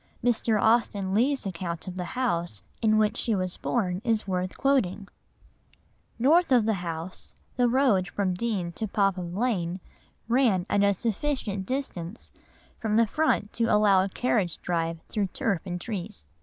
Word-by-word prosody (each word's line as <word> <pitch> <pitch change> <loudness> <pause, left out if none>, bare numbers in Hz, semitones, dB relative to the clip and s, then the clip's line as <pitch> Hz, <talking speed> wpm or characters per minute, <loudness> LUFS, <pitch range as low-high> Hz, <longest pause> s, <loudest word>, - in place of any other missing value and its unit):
Mr. 230 -2 +2
Austen 205 -4 +2
Leigh's 260 +5 +2
account 170 -2 -4
of 185 - -5
the 180 - -3
house 170 - -1 0.2
in 215 -1 +4
which 215 -1 +2
she 225 - +1
was 185 -2 -1
born 185 -6 -1
is 225 -4 0
worth 185 0 -2
quoting— 220 -8 +1 1.1
"North 305 +7 +4
of 240 -4 +5
the 220 - +2
house, 170 +1 -6 0.2
the 245 -1 +3
road 235 -7 +3
from 195 -3 -1
Deane 185 -3 -2
to 220 +6 -4
Popham 195 -4 0
Lane 190 -6 -1 0.5
ran 230 -7 +3
at 205 - +3
a 200 0 +3
sufficient 215 -3 -2
distance 230 -8 -4 0.5
from 215 -1 -1
the 230 +1 +5
front 220 -4 0
to 230 - +1
allow 210 -3 +4
a 195 - -2
carriage 195 -6 0
drive 165 -1 -1
through 205 -3 -1
turf 190 -1 -1
and 175 0 -3
trees. 175 - -5
200 Hz, 155 wpm, -27 LUFS, 180-235 Hz, 1.1 s, of